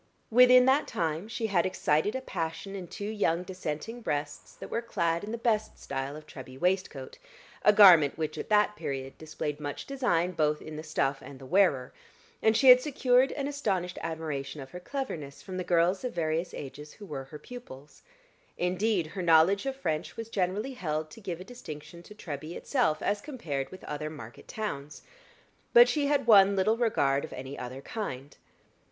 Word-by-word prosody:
Within 250 Hz, +1 st, +7 dB
that 270 Hz, +3 st, +3 dB
time 165 Hz, +3 st, -2 dB
she 230 Hz, 0 st, -3 dB
had 190 Hz, -6 st, +2 dB
excited 185 Hz, +1 st, +1 dB
a 260 Hz, -, -2 dB
passion 180 Hz, -2 st, -4 dB
in 185 Hz, -3 st, -6 dB
two 200 Hz, -, -7 dB
young 205 Hz, -5 st, 0 dB
Dissenting 185 Hz, +5 st, -5 dB
breasts 145 Hz, -7 st, -4 dB
that -, -, -10 dB
were 230 Hz, -, -1 dB
clad 170 Hz, -7 st, -1 dB
in 210 Hz, -, -5 dB
the 230 Hz, -, -3 dB
best 220 Hz, -2 st, 0 dB
style 135 Hz, +1 st, -4 dB
of 155 Hz, 0 st, -10 dB
Treby 130 Hz, -2 st, -11 dB
waistcoat 180 Hz, -7 st, -1 dB, 0.4 s
a 210 Hz, -, +6 dB
garment 180 Hz, -9 st, +7 dB
which 155 Hz, -1 st, -3 dB
at -, -, -6 dB
that 210 Hz, 0 st, +3 dB
period 135 Hz, -6 st, -5 dB
displayed 155 Hz, -2 st, -5 dB
much 145 Hz, -1 st, -5 dB
design 235 Hz, -11 st, 0 dB
both 150 Hz, -3 st, +1 dB
in 155 Hz, -, -9 dB
the 155 Hz, -, -5 dB
stuff 140 Hz, -3 st, -1 dB
and 140 Hz, -, -10 dB
the 135 Hz, -, -12 dB
wearer; 140 Hz, -6 st, +2 dB, 0.5 s
and 220 Hz, 0 st, +4 dB
she 265 Hz, +2 st, +6 dB
had 250 Hz, 0 st, +10 dB
secured 260 Hz, -2 st, +3 dB
an 280 Hz, -1 st, -3 dB
astonished 195 Hz, -11 st, -2 dB
admiration 155 Hz, -3 st, -4 dB
of 135 Hz, -1 st, -9 dB
her 180 Hz, -, -7 dB
cleverness 175 Hz, -, -5 dB
from 185 Hz, -2 st, -6 dB
the 185 Hz, -, -2 dB
girls 175 Hz, +3 st, +2 dB
of 250 Hz, -, -3 dB
various 165 Hz, +1 st, -1 dB
ages 150 Hz, +2 st, -8 dB
who 210 Hz, -, -12 dB
were 140 Hz, -7 st, -6 dB
her 150 Hz, +3 st, -10 dB
pupils; 150 Hz, -, -12 dB, 0.6 s
indeed, 185 Hz, +1 st, +1 dB
her 185 Hz, +5 st, -6 dB
knowledge 175 Hz, +6 st, +4 dB
of 270 Hz, -, -2 dB
French 160 Hz, -, -3 dB
was 225 Hz, 0 st, -6 dB
generally 205 Hz, +6 st, -1 dB
held 155 Hz, -8 st, -3 dB
to 225 Hz, -, -12 dB
give 175 Hz, -4 st, -5 dB
a -, -, -7 dB
distinction 170 Hz, -8 st, -10 dB
to 210 Hz, +4 st, -14 dB
Treby 155 Hz, -3 st, -7 dB
itself 235 Hz, -, 0 dB
as 205 Hz, 0 st, 0 dB
compared 150 Hz, -, -4 dB
with 185 Hz, -, -12 dB
other 150 Hz, +1 st, -4 dB
market 120 Hz, -7 st, -11 dB
towns. 150 Hz, -9 st, -5 dB, 0.7 s
But 485 Hz, 0 st, +9 dB
she 290 Hz, -2 st, +1 dB
had 285 Hz, -3 st, +1 dB
won 200 Hz, -3 st, +7 dB
little 215 Hz, +4 st, +2 dB
regard 140 Hz, -, +1 dB
of -, -, -7 dB
any 135 Hz, +2 st, -7 dB
other 130 Hz, +1 st, -7 dB
kind. 140 Hz, -, -6 dB
175 Hz, 185 wpm, -29 LUFS, 150-220 Hz, 0.7 s, had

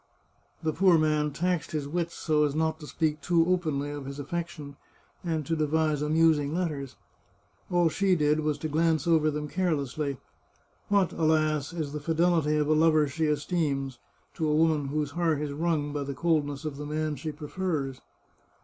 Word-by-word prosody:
The 155 Hz, -1 st, 0 dB
poor 185 Hz, 0 st, +5 dB
man 150 Hz, -1 st, +2 dB
taxed 175 Hz, +2 st, -1 dB
his 150 Hz, -2 st, -2 dB
wits 170 Hz, +2 st, -2 dB
so 150 Hz, -2 st, +1 dB
as 145 Hz, -1 st, 0 dB
not 160 Hz, 0 st, 0 dB
to 150 Hz, -, -9 dB
speak 155 Hz, -1 st, -1 dB
too 170 Hz, -2 st, +3 dB
openly 155 Hz, -6 st, 0 dB
of 145 Hz, -2 st, -6 dB
his 140 Hz, 0 st, -6 dB
affection, 150 Hz, -1 st, -5 dB, 0.5 s
and 160 Hz, -4 st, -2 dB
to 165 Hz, -, 0 dB
devise 155 Hz, -1 st, +1 dB
amusing 155 Hz, -1 st, +2 dB
let 180 Hz, -1 st, 0 dB
ters. 140 Hz, -4 st, -6 dB, 0.7 s
All 175 Hz, -2 st, +3 dB
she 190 Hz, +3 st, +2 dB
did 150 Hz, -1 st, +2 dB
was 150 Hz, -1 st, 0 dB
to 155 Hz, -, -3 dB
glance 160 Hz, 0 st, +1 dB
over 160 Hz, -2 st, +3 dB
them 150 Hz, 0 st, -3 dB
carelessly. 150 Hz, -5 st, -1 dB, 0.7 s
What, 200 Hz, -3 st, +2 dB
alas, 155 Hz, -2 st, +1 dB
is 155 Hz, -4 st, -4 dB
the 150 Hz, -, -3 dB
fidelity 160 Hz, 0 st, +2 dB
of 150 Hz, -1 st, +1 dB
a 155 Hz, -, +4 dB
lover 155 Hz, -1 st, +4 dB
she 155 Hz, +4 st, -1 dB
esteems, 145 Hz, -4 st, -1 dB, 0.3 s
to 160 Hz, -1 st, -1 dB
a 150 Hz, -, +2 dB
woman 155 Hz, -2 st, +2 dB
whose 145 Hz, 0 st, -2 dB
heart 165 Hz, -2 st, 0 dB
is 150 Hz, -1 st, -3 dB
wrung 150 Hz, -2 st, -1 dB
by 145 Hz, -, -2 dB
the 140 Hz, -1 st, -4 dB
coldness 150 Hz, -3 st, 0 dB
of 150 Hz, -2 st, -4 dB
the 150 Hz, -, -6 dB
man 155 Hz, 0 st, -2 dB
she 155 Hz, +3 st, -5 dB
prefers 150 Hz, -3 st, -3 dB
155 Hz, 180 wpm, -28 LUFS, 145-165 Hz, 0.7 s, poor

